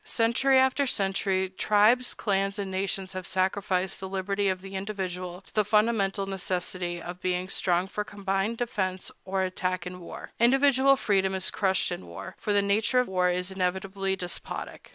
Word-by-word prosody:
Century 235 +4 +3
after 265 +2 +3
century, 195 -3 0
tribes, 215 +6 +3
clans, 195 0 0
and 200 -2 -3
nations 190 0 -2
have 185 -1 -5
sacrificed 190 0 0
the 190 - -6
liberty 195 +1 0
of 185 0 -2
the 195 0 -8
individual 185 -2 -4
to 195 - -18
the 215 - +3
fundamental 210 -2 +2
necessity 180 -2 -2
of 175 +2 -8
being 180 0 -1
strong 180 -2 +1
for 210 +1 -3
combined 200 +2 -2
defense 190 -6 -2
or 190 0 0
attack 185 -1 -2
in 180 0 -6
war. 170 - -9
Individual 270 +2 +5
freedom 190 -4 +1
is 190 0 -1
crushed 190 -2 +1
in 90 - -5
war, 90 +3 -8
for 210 - -2
the 205 -1 +3
nature 205 +5 +2
of 250 - +1
war 180 -1 +2
is 180 +1 -1
inevitably 190 +1 -1
despotic. 180 -2 -6
195 Hz, 170 wpm, -27 LUFS, 185-210 Hz, -, Individual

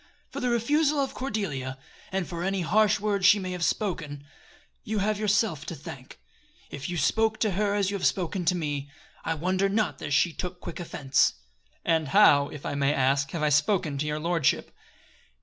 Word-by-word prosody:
For - - -5
the 250 - 0
refusal 290 +6 +2
of 270 -1 -1
Cordelia, 165 - -3 0.3
and 190 -2 -1
for 170 -1 -5
any 195 0 0
harsh 215 +4 +3
words 205 -2 -1
she 190 +2 +7
may 185 -2 -4
have 180 -2 -3
spoken, 160 -9 -2 0.6
you 215 0 -3
have 210 +1 0
yourself 200 -7 +1
to 170 - -4
thank. 135 - -10 0.5
If 140 +3 -6
you 175 - -3
spoke 220 +8 +1
to 215 - +2
her 205 +2 0
as 200 -1 +1
you 200 - -2
have - - +2
spoken 185 0 -1
to 180 - +3
me 145 -3 -3 0.3
I 165 - -1
wonder 185 +5 0
not 195 -9 0
that - - -5
she 150 +4 +2
took 180 +1 -5
quick 175 - -7
offense." 140 -6 +1 0.5
"And 160 -3 +2
how, 145 -5 +5
if 150 - -9
I - - -2
may 140 0 +1
ask, 135 +1 +2
have 160 +1 -3
I 150 - +3
spoken 150 -1 +1
to 150 - -1
your 150 0 -2
lordship?" 165 -2 0
175 Hz, 195 wpm, -27 LUFS, 150-205 Hz, 0.6 s, she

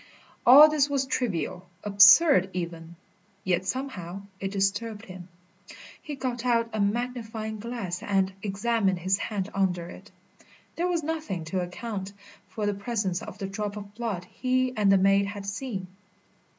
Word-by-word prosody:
All 285 +5 +11
this 300 -2 +1
was 275 -1 0
trivial, 185 -8 -2
absurd 205 - +7
even. 170 -1 -5 0.5
Yet 185 0 0
somehow 195 -7 -4 0.2
it 195 - -3
disturbed 205 +3 -1
him. 185 -2 -10 0.7
He 295 - -6
got 250 -3 -3
out 230 -2 +1
a 215 - -2
magnifying 220 0 -2
glass 205 -6 -4
and 195 -1 0
examined 200 -1 0
his 190 +3 0
hand 205 -2 -3
under 180 -3 0
it. 200 +2 -13 0.7
There 350 +2 0
was 345 -3 -1
nothing 310 - -3
to 190 - +1
account 195 +2 -5 0.3
for 215 - -4
the 205 - +1
presence 200 -3 -2
of - - -9
the 195 - -4
drop 205 +1 -4
of 200 -1 -9
blood 215 -6 -4
he 255 +5 0
and 205 -3 +3
the 195 - +6
maid 195 +1 +3
had 200 -1 -7
seen. 200 -1 -4
205 Hz, 150 wpm, -27 LUFS, 190-240 Hz, 0.7 s, All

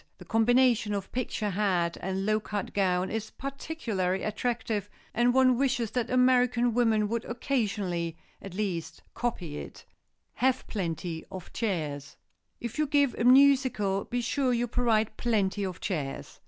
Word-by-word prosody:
The - - -12
combination 225 -1 +3
of 195 -1 -5
picture 225 -4 -2
hat 180 -4 +1
and 190 +1 -2
low 215 0 +2
cut 210 -2 -4
gown 185 -2 +1
is 220 0 -3
particularly 235 - -3
attractive 215 -2 -2 0.2
and 240 +2 +3
one 255 -1 +4
wishes 260 -5 +1
that 245 -2 -1
American 250 -1 +3
women 225 -3 +3
would 230 +1 -2
occasionally, 200 - -2 0.2
at 195 -2 -9
least, 180 -6 -3
copy 175 -11 -3
it. - - -9
[Sidenote: - - -16 0.7
HAVE 260 - -19
PLENTY 170 -4 -3
OF 185 -2 -9
CHAIRS] 150 - -3 0.4
If 235 +4 -5
you 305 - +2
give 285 -2 +3
a - - +1
musicale 255 -7 +4
be 245 0 -2
sure 255 +2 0
you 240 0 +1
provide 220 -3 +1
plenty 205 -4 0
of 185 -2 -4
chairs. 150 -8 -4
220 Hz, 150 wpm, -28 LUFS, 190-245 Hz, 0.7 s, one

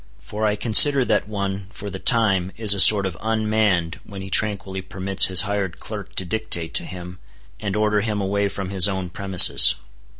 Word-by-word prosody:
For 110 +1 -6
I 105 - -2
consider 130 +5 +4
that 105 -3 -2
one, 100 -2 -6
for 100 0 -11
the 95 - -8
time, 100 -7 0
is 110 -3 +5
a 100 - -5
sort 100 0 +6
of 95 -3 -6
unmanned 110 -6 -2
when 100 -2 -12
he 95 - -11
tranquilly 100 -2 -2
permits 95 +1 +1
his 95 -1 +4
hired 100 -4 -5
clerk - - -11
to 95 - -3
dictate 90 -5 -5
to - - -3
him, 90 -1 -11 0.4
and 100 -2 -6
order 105 0 -1
him 105 -1 -4
away 100 +1 -3
from 100 -1 -8
his 95 -2 +2
own 95 -3 -6
premises. 95 -6 +5
100 Hz, 190 wpm, -19 LUFS, 95-105 Hz, 0.4 s, sort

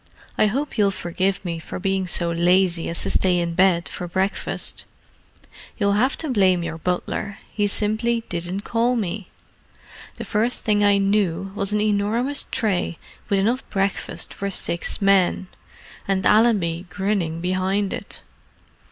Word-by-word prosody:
I 215 - +4
hope 270 +3 -2
you'll 200 -1 +5
forgive 185 +1 -2
me 170 -2 -3
for - - -7
being 190 0 -1
so 170 -1 -1
lazy 175 0 +2
as 170 - 0
to - - +1
stay 185 -2 +3
in 170 -1 -1
bed 180 -1 +3
for 180 - -6
breakfast. 190 +3 -1 0.9
You'll 200 -2 +2
have 245 +7 +2
to 310 -4 -3
blame 185 -6 +3
your 165 -1 -5
butler: 180 +4 -2 0.2
he 205 -1 +1
simply 220 +3 0
didn't 175 +3 -3
call 235 +3 +1
me. 205 -3 -3 0.9
The - - -6
first 230 +3 0
thing 205 -1 +2
I 205 -1 +5
knew 195 -2 +1
was 200 0 -1
an 210 0 +1
enormous 215 +7 +1
tray 195 -6 -1 0.3
with 200 - +2
enough 230 +7 +1
breakfast 195 -1 -2
for 200 - -3
six 180 0 -2
men—and 190 0 -1
Allenby 195 -6 +3
grinning 185 -3 -1
behind 185 +3 0
it." - - -7
195 Hz, 145 wpm, -22 LUFS, 180-210 Hz, 0.9 s, you'll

